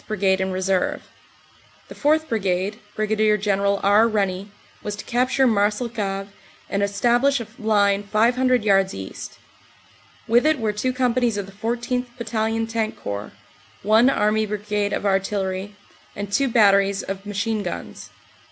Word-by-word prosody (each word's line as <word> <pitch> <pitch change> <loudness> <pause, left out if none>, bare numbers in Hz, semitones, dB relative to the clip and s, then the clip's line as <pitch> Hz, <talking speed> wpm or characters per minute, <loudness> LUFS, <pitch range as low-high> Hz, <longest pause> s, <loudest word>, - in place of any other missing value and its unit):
Brigade 190 -2 +1
in 190 0 -1
reserve. 185 0 -1 0.8
The - - -10
4th. 315 +2 +1
Brigade, 195 -2 -1 0.2
Brig. 215 0 +1
General 200 0 +1
R. 205 +3 +5
Rennie, 200 -2 -1 0.3
was 210 - -4
to 205 - -9
capture 255 +2 +1
Marcel 210 +1 +1
cave 195 -3 -3 0.4
and 200 - 0
establish 240 +7 +2
a 235 - -5
line 205 -2 +2
500 240 +4 +2
yards 195 -2 +2
east. 95 0 -8 0.9
With 240 +6 +4
it 310 -1 +3
were 220 -2 -1
two 230 +5 -1
com 250 -2 +1
panies 240 -4 +1
of 200 - -3
the 195 - -13
14th. 240 +4 -2
Battalion 225 -1 -1
Tank 225 -1 -3
Corps, 100 +1 -5 0.5
one 220 +5 +5
Army 215 -3 +1
Brigade 210 0 -2
of - - -2
Artillery, 195 0 -1 0.4
and 200 0 -5
two 275 +3 +2
batteries 200 -4 +3
of 195 0 -5
machine 210 +2 -1
guns. 180 -3 -7
210 Hz, 145 wpm, -22 LUFS, 200-230 Hz, 0.9 s, R